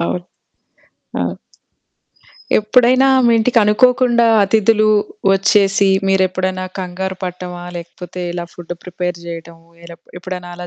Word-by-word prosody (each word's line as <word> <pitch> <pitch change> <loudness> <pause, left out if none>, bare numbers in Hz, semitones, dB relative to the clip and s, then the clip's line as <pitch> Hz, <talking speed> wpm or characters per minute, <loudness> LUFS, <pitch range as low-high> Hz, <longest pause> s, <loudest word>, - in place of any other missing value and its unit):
అవును. 175 +1 -2 1.0
ఆ! - - 0 1.4
ఎప్పుడైనా 250 +4 +3 0.2
మీ 235 - +4
ఇంటికనుకోకుండా 235 +1 +3 0.2
అతిథులు 215 +2 +2 0.5
వచ్చేసి 195 0 +3 0.2
మీరెప్పుడన్నా 185 -1 0
కంగారు 190 +1 -4
పట్టమా? 180 -1 -7
లేకపోతే 175 +1 -8
ఇలా 175 0 -5
ఫుడ్డు 175 0 -8
ప్రిపేర్ 180 -1 -4
జేయటము 165 -1 -10 0.2
ఇలా 170 0 -11 0.2
ఎప్పుడన్నా 180 -1 -7
అలా 180 0 -7
185 Hz, 100 wpm, -17 LUFS, 175-215 Hz, 1.4 s, మీ